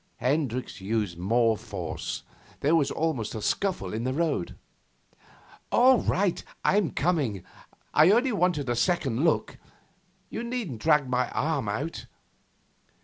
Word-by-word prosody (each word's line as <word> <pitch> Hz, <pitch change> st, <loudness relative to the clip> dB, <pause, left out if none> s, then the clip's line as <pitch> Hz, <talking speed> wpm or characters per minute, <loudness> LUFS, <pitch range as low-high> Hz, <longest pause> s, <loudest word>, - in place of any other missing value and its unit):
Hendricks 130 Hz, -6 st, -1 dB
used 100 Hz, -4 st, -2 dB
more 115 Hz, +4 st, +3 dB
force. -, -, -5 dB, 0.4 s
There 150 Hz, +4 st, +3 dB
was 145 Hz, -4 st, +2 dB
almost 150 Hz, -11 st, -2 dB
a -, -, -3 dB
scuffle 180 Hz, -, -1 dB
in 110 Hz, +2 st, -2 dB
the 130 Hz, +1 st, -1 dB
road. 155 Hz, -, -1 dB, 1.2 s
'All 255 Hz, 0 st, +6 dB
right, 190 Hz, -1 st, 0 dB, 0.2 s
I'm 200 Hz, -5 st, +3 dB
coming. 140 Hz, -, 0 dB, 0.5 s
I 155 Hz, +3 st, +6 dB
only 245 Hz, +6 st, +4 dB
wanted 180 Hz, -7 st, +1 dB
to -, -, -5 dB
look 120 Hz, -, -1 dB
a -, -, +3 dB
second. 160 Hz, -4 st, +1 dB, 0.7 s
You -, -, -4 dB
needn't 235 Hz, -, -4 dB
drag 150 Hz, -3 st, +3 dB
my 125 Hz, 0 st, 0 dB
arm 145 Hz, -8 st, -1 dB
out. 140 Hz, +11 st, -4 dB
145 Hz, 135 wpm, -27 LUFS, 115-175 Hz, 1.2 s, All